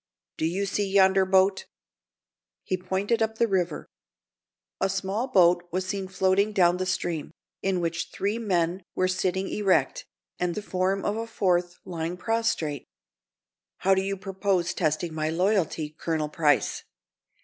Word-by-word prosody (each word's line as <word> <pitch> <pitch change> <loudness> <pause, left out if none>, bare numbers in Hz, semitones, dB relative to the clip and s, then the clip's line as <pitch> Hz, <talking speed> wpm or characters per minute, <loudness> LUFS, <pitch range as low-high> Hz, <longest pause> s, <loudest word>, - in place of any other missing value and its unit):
Do 160 - 0
you 190 +4 -1
see 200 0 -1
yonder 190 -1 +5
boat?" 190 0 +3 1.0
He 185 - -1
pointed 190 +5 -1
up 220 0 0
the 235 - +3
river. 180 -6 -1 0.9
A 195 - +1
small 195 +5 -2
boat 175 -6 +4
was 185 +2 -1
seen 190 0 -3
floating 190 +2 +1
down 180 -3 +4
the 185 0 -2
stream, 175 -4 -2 0.3
in 190 -2 0
which 170 0 -2
three 205 +4 -2
men 180 -4 0
were 185 - +2
sitting 185 +1 -1
erect, 185 -10 +1 0.3
and 180 -1 -1
the 210 - -4
form 190 0 -1
of 205 - 0
a 230 0 -3
fourth, 180 -5 0
lying 170 0 -4
prostrate. 180 - -1 0.9
"How 195 - +3
do 190 - +2
you 195 +1 -2
propose 190 -2 -1
testing 160 0 -1
my 155 0 -1
loyalty, 165 -4 0
Colonel 155 -2 -1
Price?" 150 -3 +1
185 Hz, 150 wpm, -26 LUFS, 175-195 Hz, 1.0 s, yonder